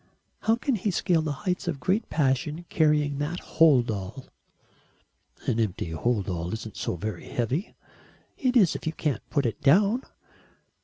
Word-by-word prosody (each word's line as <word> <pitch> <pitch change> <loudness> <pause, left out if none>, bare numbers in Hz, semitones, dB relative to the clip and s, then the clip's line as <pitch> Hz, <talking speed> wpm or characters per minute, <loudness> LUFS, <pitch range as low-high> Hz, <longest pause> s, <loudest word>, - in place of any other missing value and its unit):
How 225 - +2
can 260 +3 -1
he 205 +2 -1
scale 175 -2 +2
the 155 -1 -2
heights 180 -1 -1
of 170 - 0
a - - -14
great 190 - 0
passion 150 +3 0
carrying 150 -3 +2
that 160 +5 -2
hold 140 -8 +4
all?" 100 +5 -6 1.2
"An 115 - 0
empty 105 -4 -1
hold 105 +4 0
all 85 -2 -3
isn't 110 -2 -6
so - - -2
very 95 +2 -5
heavy." 125 - -2 0.6
"It 255 -2 +2
is 190 -8 +5
if - - -5
you 160 - 0
can't 150 -8 -1
put 140 -3 +1
it 115 - -2
down." 200 - +4
145 Hz, 165 wpm, -27 LUFS, 115-175 Hz, 1.2 s, is